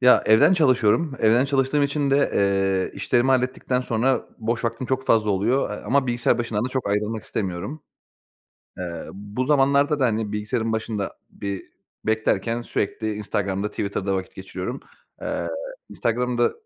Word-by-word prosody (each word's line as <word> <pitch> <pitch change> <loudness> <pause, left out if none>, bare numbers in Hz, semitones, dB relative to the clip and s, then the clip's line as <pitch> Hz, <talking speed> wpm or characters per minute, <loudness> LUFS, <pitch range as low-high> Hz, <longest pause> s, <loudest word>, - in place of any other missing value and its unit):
Ya, 125 -1 +6
evden 110 +11 +6
çalışıyorum. 135 - +3
Evden 115 +4 +4
çalıştığım 140 +1 +1
için 140 0 +1
de, 140 +1 +3
eee, 95 -1 +2
işlerimi 120 +5 +2
hallettikten 130 0 +1
sonra 125 +2 0
boş 115 +1 -2
vaktim 115 +2 -2
çok 130 +1 -1
fazla 110 -2 +3
oluyor, 105 +8 +1
eee, 105 - -3
ama 140 0 +2
bilgisayar 120 0 +1
başından 115 -2 -1
da - - -1
çok 130 -5 -2
ayrılmak 105 +1 -1
istemiyorum. 100 - -4 1.0
Eee, 85 -2 -5
bu 105 +6 -4
zamanlarda 140 +1 +3
da, 130 - +4
hani, 110 -3 0
bilgisayarın 110 +2 -1
başında 110 -2 -2 0.2
bir 100 -1 -5 0.4
beklerken 110 +1 0
sürekli 110 -1 -2
Instagram'da, 100 -1 -2
Twitter'da 100 -1 -2
vakit 95 -1 -5
geçiriyorum. 95 +6 -5 0.4
Eee, - - -2 0.4
Instagram 125 +1 -1
da 120 - +3
115 Hz, 150 wpm, -23 LUFS, 105-130 Hz, 1.0 s, Ya